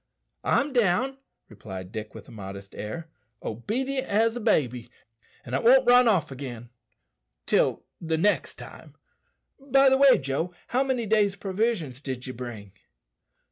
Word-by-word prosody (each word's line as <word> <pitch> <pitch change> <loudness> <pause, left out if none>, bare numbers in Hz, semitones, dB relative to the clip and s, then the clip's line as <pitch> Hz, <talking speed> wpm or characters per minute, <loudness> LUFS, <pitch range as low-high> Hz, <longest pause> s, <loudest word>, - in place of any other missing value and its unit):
"I'm 280 0 +1
down," 245 +4 +1 0.3
replied 95 -3 -9
Dick, 110 -1 -7
with - - -11
a - - -14
modest 100 -2 -9
air, 135 +11 -6 0.4
"obedient 260 - -3
as 225 +3 +2
a - - -3
baby, 125 - 0 0.6
and 125 - -8
won't 260 +2 +6
run 245 0 +7
off 170 -9 +2
again 125 -3 -7 0.8
till - - +1 0.2
the 160 -1 -1
next 205 +5 +1
time. - - -12 0.6
By 275 0 +4
the 265 0 +3
way, 275 -1 +7
Joe, 145 +6 -3
how 255 - +1
many 260 -4 -1
days' 205 -2 +2
provisions 195 - -2
did 130 -3 -5
ye 130 - -6
bring?" 115 -5 -8
175 Hz, 140 wpm, -26 LUFS, -, 0.8 s, run